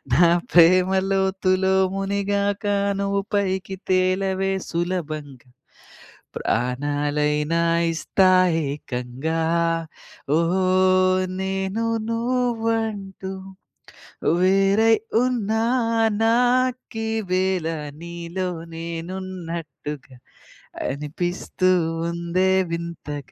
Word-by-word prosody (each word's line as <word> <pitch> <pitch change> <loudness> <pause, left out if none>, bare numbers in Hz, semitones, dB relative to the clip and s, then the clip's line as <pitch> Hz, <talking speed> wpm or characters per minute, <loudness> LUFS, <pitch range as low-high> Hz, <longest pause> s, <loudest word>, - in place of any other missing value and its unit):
నా 170 +6 +6 0.2
ప్రేమ 180 +2 +6 0.2
లోతులో 190 -1 +1 0.2
మునిగాక 200 +1 -1 0.4
నువ్వు 200 0 0
పైకి 190 -1 -1
తేలవే 190 +1 +1 0.2
సులభంగా. 155 -7 -4 0.9
ప్రాణాలైనా 145 +5 0 0.3
ఇస్తా 185 +3 +2 0.4
ఏకంగా. 140 +3 -3 1.0
ఓహ్ 185 +1 +3
నేను 190 +3 -2 0.2
నువ్వంటూ 225 -5 -1 1.1
వేరై 195 +4 +4 0.3
ఉన్నా 220 -3 0 0.6
నాకీవేల 225 -7 +1 0.3
నీలో 170 +2 -4 0.3
నేనున్నట్టుగ 165 -3 -6 0.9
అనిపిస్తూ 175 +6 -2 0.4
ఉందే 170 +2 0 0.2
వింతగ 165 -5 -6
185 Hz, 55 wpm, -23 LUFS, 165-195 Hz, 1.1 s, నా